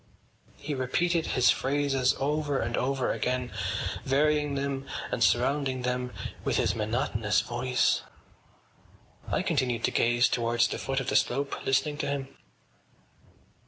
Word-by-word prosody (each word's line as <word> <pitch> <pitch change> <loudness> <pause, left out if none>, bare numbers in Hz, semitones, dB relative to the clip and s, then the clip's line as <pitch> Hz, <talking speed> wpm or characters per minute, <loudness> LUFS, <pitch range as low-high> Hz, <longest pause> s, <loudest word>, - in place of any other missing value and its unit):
He 150 +1 -4
repeated 160 +6 0
his 125 - +4
phrases 135 -1 +1
over 145 0 0
and 120 +1 -1
over 130 0 0
again, 125 0 -1 0.5
varying 150 +1 +2
them 135 0 -3 0.2
and 120 - +1
surrounding 130 +5 +1
them 125 0 -1 0.3
with - - 0
his - - +2
monotonous 110 -1 0
voice. 125 +1 +1 1.3
I - - 0
continued 120 -3 0
to - - +2
gaze 120 +1 +3
towards 120 0 +1
the - - -4
foot 135 0 -1
of 130 - -3
the - - -1
slope, 140 +3 0
listening 135 +3 +1
to 145 - -1
him. 140 -1 -4
130 Hz, 130 wpm, -28 LUFS, 125-140 Hz, 1.3 s, his